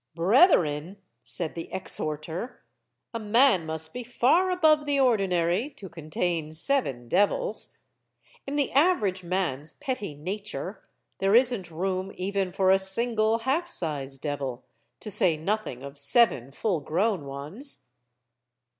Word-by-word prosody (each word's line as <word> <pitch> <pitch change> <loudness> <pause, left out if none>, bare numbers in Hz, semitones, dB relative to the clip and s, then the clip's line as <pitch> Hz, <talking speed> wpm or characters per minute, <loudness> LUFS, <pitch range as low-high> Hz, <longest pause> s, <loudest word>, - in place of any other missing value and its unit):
'* - - -47
"Brethren," 175 - +3 0.3
said 165 -3 -1
the 165 - -7
exhorter, 165 +4 -3 0.5
"a 230 - -3
man 215 -5 +3
must 160 0 -5
be 250 - -5
far 265 +10 +2
above 315 -5 +3
the 285 -1 +1
ordinary, 195 - +1
to 195 -9 -9
contain 165 0 -3
seven 160 - 0
devils. 205 - 0 0.7
In 280 - -3
the 285 -2 0
average 255 - +2
man's 170 -5 -2
petty 255 - -5
nature 190 +2 -6 0.4
there 195 +2 +3
isn't 240 -7 +3
room 185 +3 -3
even 195 0 -2
for 190 +1 +2
a 195 - +5
single 220 +3 +2
half 315 +7 0
size 145 - +1
devil, 135 -3 -4 0.4
to 210 - -4
say 180 -5 +3
nothing 165 - -3
of 140 +1 -7
seven 140 - +3
full 180 +4 -1
grown 180 +3 -1
ones." 150 - -6
190 Hz, 130 wpm, -26 LUFS, 160-235 Hz, 0.7 s, a